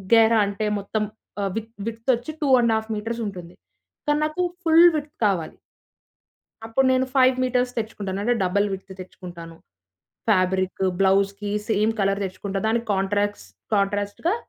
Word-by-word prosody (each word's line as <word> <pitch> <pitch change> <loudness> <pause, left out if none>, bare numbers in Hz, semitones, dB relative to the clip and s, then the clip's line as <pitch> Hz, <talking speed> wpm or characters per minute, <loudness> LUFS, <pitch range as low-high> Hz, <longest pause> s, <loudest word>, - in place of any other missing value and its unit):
గేరా 225 0 +5
అంటే 210 +1 -2
మొత్తం 210 +2 -2 0.4
ఆహ్, 195 - 0
వి 225 - 0 0.2
విడ్త్ 230 +2 -5
వచ్చి 240 +6 -3
2.5 235 -5 +3
మీటర్స్ 230 +2 -4
ఉంటుంది. 180 -3 -8 0.5
కానీ, 295 0 +2
నాకు 310 +4 -2 0.2
ఫుల్ 330 +1 +7
విడ్త్ 295 0 -4
కావాలి. 180 -6 -1 1.1
అప్పుడు 260 +4 +2
నేను 260 0 +2
5 260 -1 +5
మీటర్స్ 250 0 +1
తెచ్చుకుంటాను. 200 -3 -4
అంటే 240 +2 +2
డబుల్ 200 +3 +2
విడ్త్ 190 0 -7
తెచ్చుకుంటాను. 175 -2 -10 0.7
ఫాబ్రికు 190 -1 +2
బ్లౌజ్‌కి 200 +1 +2 0.2
సేమ్ 215 +1 +2
కలర్ 195 +1 +1
తెచ్చుకుంటా. 195 +1 -4
దానికి 230 +1 0
కాంట్రాస్ 205 +1 -1 0.3
కాంట్రాస్ట్‌గా 205 - 0
210 Hz, 135 wpm, -23 LUFS, 195-235 Hz, 1.1 s, ఫుల్